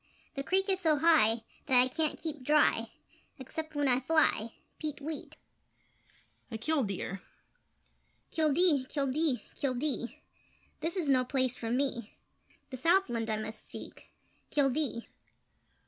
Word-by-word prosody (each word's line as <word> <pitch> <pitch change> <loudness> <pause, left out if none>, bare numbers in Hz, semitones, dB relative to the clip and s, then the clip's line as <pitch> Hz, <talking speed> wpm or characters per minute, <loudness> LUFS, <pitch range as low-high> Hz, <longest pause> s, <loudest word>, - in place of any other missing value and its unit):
The 275 - -3
creek 380 +7 +1
is 380 -1 +2
so 320 -4 +3
high 275 -8 +4 0.2
That 260 -3 +6
I 250 - +5
can't 310 +3 0
keep 305 -4 -4
dry 295 +3 +3 0.5
Except 310 +4 -7
when 290 -1 +1
I 250 -1 +4
fly! 260 -6 +1 0.2
Peet 305 -2 -3
weet! 305 +2 -5 1.1
[A 225 - -4
Kildeer]: 215 - -2 1.1
Kildee! 310 -3 +3
Kildee! 280 -1 0
Kildee! 260 -2 -2 0.6
This 335 +4 -2
is 340 -5 0
no 260 -2 +4
place 255 -1 0
for 230 -2 -5
me! 245 -3 -1 0.6
The 260 - -5
southland 260 -7 +2
I 215 - 0
must 215 0 -6
seek - - -10 0.4
Kildee! 275 -4 +1
275 Hz, 125 wpm, -31 LUFS, 245-315 Hz, 1.1 s, That